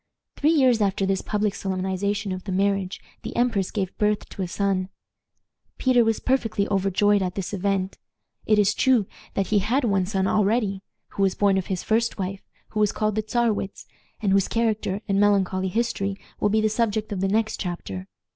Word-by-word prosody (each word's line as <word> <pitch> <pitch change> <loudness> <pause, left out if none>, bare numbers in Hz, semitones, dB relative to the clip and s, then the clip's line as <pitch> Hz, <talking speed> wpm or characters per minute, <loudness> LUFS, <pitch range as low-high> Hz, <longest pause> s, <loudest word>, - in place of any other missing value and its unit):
Three 295 - +2
years 260 -8 +4
after 195 -1 +1
this 190 0 0
public 210 -1 -1
solemnization 190 +2 -2
of 185 +1 -5
the 195 - -4
marriage 195 0 0 0.2
the - - -7
empress 225 -6 +1
gave 195 -4 -3
birth 210 0 +1
to - - -7
a 185 - -1
son. 190 0 -1 0.9
Peter 255 -2 +4
was 225 -1 +1
perfectly 225 -6 0
overjoyed 200 +1 +2
at 180 -1 -2
this 195 0 -4
event. 195 -1 -1 0.5
It 215 - +4
is 210 0 +4
true 250 -5 +3 0.3
that 195 - +1
he 210 - +4
had 240 +8 +1
one 195 -5 +1
son 190 -1 0
already, 205 0 +1 0.3
who - - -5
was 195 -1 +2
born 200 -1 +3
of 185 - -5
his 185 -2 -2
first 225 +1 +1
wife, 195 0 -4 0.3
who 215 - -3
was 210 -1 +3
called 215 0 0
the 215 - 0
Czarewitz, 215 -3 -1 0.3
and 205 -3 0
whose 195 0 +3
character 220 -3 0
and 195 -1 +1
melancholy 195 -2 +2
history 200 -2 -1 0.2
will 210 - +2
be 215 +1 +2
the 215 - +3
subject 215 -1 -1
of 195 -2 -2
the 195 - +2
next 215 +2 0
chapter. 95 - -5
200 Hz, 190 wpm, -24 LUFS, 190-215 Hz, 0.9 s, years